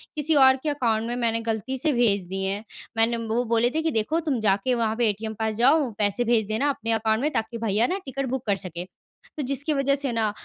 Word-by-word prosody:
किसी 305 +1 +2
और 265 -2 +7
के 310 - 0
अकाउंट 230 -6 0
में 240 - -3
मैंने 230 -2 0
गलती 225 +3 -3
से 305 +4 +3
भेज 220 -6 +2
दिए 190 +1 -2
हैं 205 +2 -6 0.3
मैंने। 230 +1 +3
वो 225 +2 0
बोले 230 +1 +2
थे 320 - +1
कि 320 0 0
देखो 230 +8 0
तुम 295 -7 -1
जा 200 -3 +3
के 255 -1 +2
वहाँ 225 -2 0
पे 235 -1 +2
ए - - +1
टी 220 - -6
एम 220 - -4
पास 220 -1 -1
जाओ 270 +4 +3
पैसे 205 +3 +1
भेज 230 -2 +2
देना 220 +7 0
अपने 230 -5 -3
अकाउंट 220 +1 +1
में 300 - 0
ताकि 225 +1 -2
भैया 225 +1 +1
न 385 - -1
टिकट 275 0 -3
बुक 265 0 -3
कर 200 - +3
सकें। 180 -2 -6 0.5
तो 295 - -2
जिसकी 275 +4 -1
वजह 275 0 +1
से 280 -2 -1
न, 225 -2 0
235 Hz, 260 wpm, -24 LUFS, 220-275 Hz, 0.5 s, और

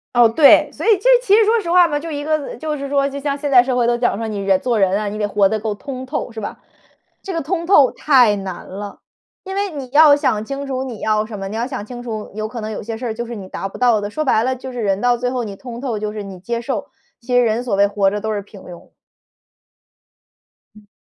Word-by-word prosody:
哦， 240 -1 +6
对， 275 +6 +6
所 - - -7
以 - - +3
这 410 +7 +1
其 410 -5 +4
实 450 - +6
说 450 +2 +3
实 345 - -6
话 355 0 +6
嘛， 295 -1 -1
就 330 +2 -7
一 290 -2 -4
个 310 - -4
呃， 290 - -7
就 305 -1 -4
是 280 0 -5
说 280 0 +1
就 280 0 -6
像 280 0 -2
现 290 0 -3
在 250 -2 +8
社 250 +1 -1
会 245 -1 +2
都 240 0 +2
讲 240 -3 0
说 225 - -4
你 210 - -4
人 195 -1 +2
做 240 -3 0
人 195 0 +2
啊， 210 -1 -2
你 210 - -6
得 210 -1 -1
活 200 -1 +2
得 220 - -1
够 210 0 -3
通 260 +3 -7
透 260 -2 -4
是 225 - -7
吧？ 205 - -6 0.6
这 390 - -6
个 330 - -1
通 335 +3 -3
透 295 -8 +5
太 245 -8 +4
难 190 -2 -7
了， 200 +1 -8 0.4
因 385 - -6
为 400 0 -1
你 275 -5 -7
要 295 0 +7
想 220 -7 0
清 275 +3 -5
楚 260 -1 -3
你 240 -5 -8
要 215 0 +1
什 215 -1 -8
么， 195 0 -5
你 210 - -6
要 235 +2 -1
想 205 - -5
清 240 +2 -8
楚 220 -3 -6
有 215 +1 -4
可 230 +1 -7
能 215 0 -5
有 215 - -5
些 225 +2 -5
事 240 +3 -7
儿 225 - -2
就 235 +2 -5
是 235 0 -7
你 190 -3 -9
达 195 - -4
不 195 - -10
到 240 -3 +3
的。 205 0 -4
说 310 +9 -3
白 240 -6 +2
了 260 +1 0
就 260 +1 -8
是 245 -1 -5
人 200 -2 0
到 245 0 +2
最 250 +1 -1
后 250 -2 -2
你 200 -3 -7
通 240 0 -8
透 240 -6 -3
就 210 0 -4
是 210 -1 -5
你 195 -2 -9
接 235 +6 -3
受， 240 -4 -3 0.3
其 250 0 -3
实 245 - +5
人 225 0 +1
所 245 -5 -1
谓 200 +1 +4
活 200 -1 +1
着 205 +1 -4
都 220 +1 -2
是 205 - -2
平 200 -1 -14
庸。 175 -2 -13 1.8
嗯。 210 -1 -18
240 Hz, 305 characters per minute, -19 LUFS, 210-275 Hz, 1.8 s, 在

